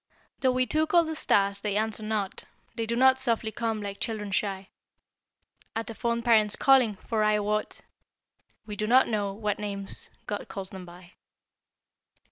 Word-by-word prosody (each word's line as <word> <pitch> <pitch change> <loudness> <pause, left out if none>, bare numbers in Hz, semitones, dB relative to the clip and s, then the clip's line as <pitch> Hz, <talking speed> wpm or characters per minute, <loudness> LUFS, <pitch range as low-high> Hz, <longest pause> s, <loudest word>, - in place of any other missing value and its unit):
Though 260 - +2
we 255 0 +2
too 310 +5 0
call 340 +1 +4
the 320 0 -4
stars, 200 -9 +1
they 205 0 -2
answer 220 0 +3
not, 215 -3 -3 0.3
They 225 -1 -3
do 235 - -1
not 260 +1 +5
softly 230 -4 -1
come 225 -2 -3
like 200 0 -6
children 210 -3 -3
shy 195 -1 -2 1.1
At 225 +1 -3
a - - -7
fond 235 +1 -2
parent's 215 -3 +4
calling, 255 -6 +4
for, 220 -2 0
I 215 0 +3
wot, 210 +1 -2 0.8
We 210 - -6
do 215 +1 -2
not 255 +3 +5
know 205 -3 -1
what 210 0 -3
names 200 -1 -3 0.2
God 205 - -5
calls 195 -1 +1
them 185 -2 -9
by. 175 0 -14
215 Hz, 170 wpm, -27 LUFS, 200-235 Hz, 1.1 s, not